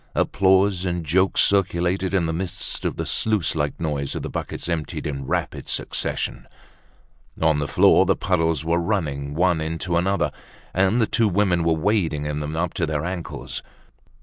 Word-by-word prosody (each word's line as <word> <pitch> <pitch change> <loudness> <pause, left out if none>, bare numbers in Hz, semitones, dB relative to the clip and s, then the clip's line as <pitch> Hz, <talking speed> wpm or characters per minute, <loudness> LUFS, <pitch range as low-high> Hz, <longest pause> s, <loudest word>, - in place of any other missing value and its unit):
Applause 95 -1 +3
and 85 -2 -2
jokes 95 +5 +3
circulated 95 -1 +2
in 95 -3 +2
the 80 - -1
midst 90 +1 -4
of - - -1
the - - -3
sluice 110 -5 0
like 75 -2 -2
noise 75 -4 -2
of - - -4
the - - -5
buckets - - -5
emptied 80 -4 -3
in 70 -3 -4
rapid - - -2
succession! - - -2 0.9
On 80 -2 +3
the 75 - -1
floor - - +5
the - - +3
puddles 80 -5 0
were 85 +1 +2
running 75 -7 -2
one 85 -1 +2
into 80 +2 -1
another, 95 +3 +1 0.4
and 95 +5 +2
the 115 - +4
two 115 +1 +2
women 90 -3 +2
were 80 0 +3
wading 80 -4 0
in 75 0 -2
them 75 +1 -4
up 85 +1 -1
to 85 - -1
their 75 0 -2
ankles. 90 -2 -5
85 Hz, 175 wpm, -23 LUFS, 80-95 Hz, 0.9 s, floor